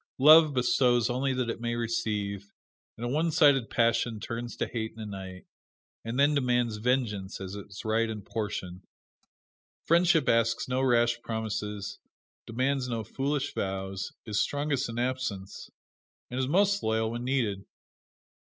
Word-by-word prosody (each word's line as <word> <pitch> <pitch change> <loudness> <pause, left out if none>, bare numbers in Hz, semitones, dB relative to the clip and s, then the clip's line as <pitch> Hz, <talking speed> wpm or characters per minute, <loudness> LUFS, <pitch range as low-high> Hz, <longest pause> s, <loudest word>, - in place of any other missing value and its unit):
Love 155 +1 +7
bestows 125 -1 +3
only 135 +2 0
that 125 -3 -1
it 115 - -7
may 120 0 -1
receive, 105 -4 -2 0.5
and 120 - -5
a - - -1
one 155 +6 +1
sided 145 -7 +4
passion 115 -2 +1
turns 120 +2 -5
to - - -1
hate 110 -2 -4
in 115 - -14
a 110 - -5
night, 95 -2 -8 0.6
and 115 +3 -3
then 145 +2 +5
demands 125 -5 +1
vengeance 105 -5 -1
as 95 0 -6
its 100 0 -9
right 110 +1 +1
and 105 -3 -6
portion. 95 -4 -4 1.0
Friendship 170 -1 +4
asks 115 0 +2
no 130 +1 0
rash 120 -2 +2
promises, 105 -3 -4 0.5
demands 130 +2 -1
no 115 -2 -2
foolish 135 +6 -2
vows, 95 0 -3
is 105 -2 -1
strongest 145 -3 -1
in 115 - -6
absence, 120 -6 -3 0.6
and 130 +1 -1
most 200 +4 +3
loyal 110 0 0
when 120 +1 -4
needed. 120 -7 -1
120 Hz, 145 wpm, -28 LUFS, 105-130 Hz, 1.0 s, Love